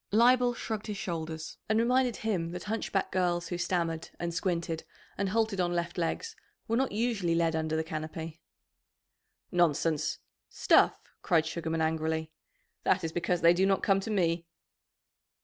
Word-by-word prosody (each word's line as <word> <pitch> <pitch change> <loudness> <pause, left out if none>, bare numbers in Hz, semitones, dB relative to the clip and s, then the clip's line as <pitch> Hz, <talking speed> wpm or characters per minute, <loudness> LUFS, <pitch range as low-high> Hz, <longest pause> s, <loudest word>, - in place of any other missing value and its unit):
Leibel 245 +3 +5
shrugged 220 -2 -4
his 210 -1 -4
shoulders, 160 -3 -5
and 220 - +3
reminded 250 +1 +3
him 190 -7 -1
that 180 - -5
hunchbacked 210 -2 -1
girls 175 -2 0
who 175 - -2
stammered 170 -2 -1
and 170 0 -2
squinted 165 -2 -1 0.3
and 200 -1 -1
halted 220 -1 +1
on 175 0 0
left 170 0 -2
legs 445 - -2 0.3
were 230 - +1
not 265 +2 +1
usually 210 -6 0
led 165 -1 +2
under 160 0 -1
the 160 - 0
canopy. 160 +1 -6 1.1
"Nonsense! 165 -3 +2 0.3
Stuff!" - - +4 0.2
cried 160 -2 +3
Sugarman 160 0 -2
angrily. 160 0 -1 0.5
"That - - +2
is 165 - -2
because 175 +1 0
they 170 +1 +7
do 190 +2 +2
not 195 -1 +2
come 195 -2 +4
to 195 - -5
me." 170 -5 +1
175 Hz, 155 wpm, -30 LUFS, 165-205 Hz, 1.1 s, they